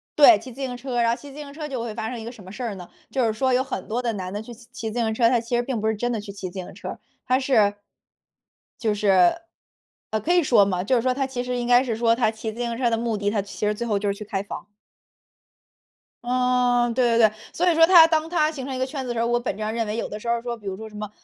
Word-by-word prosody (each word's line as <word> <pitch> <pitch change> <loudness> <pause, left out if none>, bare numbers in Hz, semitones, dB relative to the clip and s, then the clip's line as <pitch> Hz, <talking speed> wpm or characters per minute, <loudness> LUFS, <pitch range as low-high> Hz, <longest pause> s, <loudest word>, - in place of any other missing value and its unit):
对， 310 +3 +8
骑 260 - -10
自 260 +4 -10
行 255 -2 -3
车。 245 -1 -2
然 230 - +3
后 230 - +2
骑 285 -1 -11
自 275 - -12
行 285 -2 -8
车 305 -1 -6
就 260 -4 -4
会 230 -2 -4
发 220 0 -4
生 245 -1 -5
一 220 - -8
个 235 - -6
什 220 -5 -14
么 185 - -11
事 250 +5 -6
儿 225 -4 -3
呢？ 180 -2 -10 0.2
就 260 -3 0
是 220 - +1
说 260 +3 +1
有 255 - +3
很 265 -8 -5
多 235 +3 -1
的 235 -2 -1
男 185 -3 -5
的 205 - -3
去 235 +2 -10
骑 230 -1 -7
自 240 - -3
行 220 -2 0
车， 230 +1 +3
他 245 -1 +3
其 235 +1 -3
实 240 - +2
并 245 -2 -2
不 220 - -1
是 220 - +1
真 240 +3 -1
的 230 - -1
去 205 -1 -8
骑 195 -2 -6
自 175 - -17
行 180 - -8
车。 - - -7 0.3
他 255 +1 +2
是 220 -7 +3 1.0
就 220 -3 +1
是， 190 -4 +4 0.8
呃， 220 - -1
可 330 - 0
以 355 - +5
说 235 -7 +5
吗？ 180 -2 -1
就 255 +6 +2
是 235 - +2
说 255 +1 +1
他 270 +1 -1
其 250 -2 -4
实 250 0 -3
应 240 - -2
该 245 +1 +5
是 235 -4 -2
说 230 0 +3
他 235 -3 +2
骑 220 0 -5
自 230 - -11
行 235 -1 -2
车 245 -1 +2
的 230 - +1
目 230 -1 -1
的， 205 0 0
他 210 - 0
其 200 +1 -5
实 210 - +2
最 235 - -4
后 210 - +1
就 205 0 -1
是 - - +1
去 210 - -7
开 195 -2 -2
房。 200 - -8 1.6
嗯， 245 -1 +2
对 250 +1 +2
对 225 -2 +7
对。 215 - -9 0.2
所 360 +1 +1
以 335 - +2
说 325 0 +7
他 335 -2 +8
当 320 0 0
他 310 -3 +2
形 275 -5 -6
成 270 - -4
一 255 - -4
个 260 - +1
圈 270 +1 -5
子 250 - -6
的 - - -1
时 235 - -3
候， 230 - +1
我 240 0 +2
本 240 - -2
质 - - -7
上 215 0 -1
认 230 -1 -1
为 210 +1 -3
有 - - -2
的 210 - -6
时 215 - -9
候 235 0 +1
说， 240 0 -4
比 210 - -18
如 190 - -3
说 220 +1 -8
什 210 - -14
么 210 -1 -5
235 Hz, 340 characters per minute, -24 LUFS, 215-255 Hz, 1.6 s, 对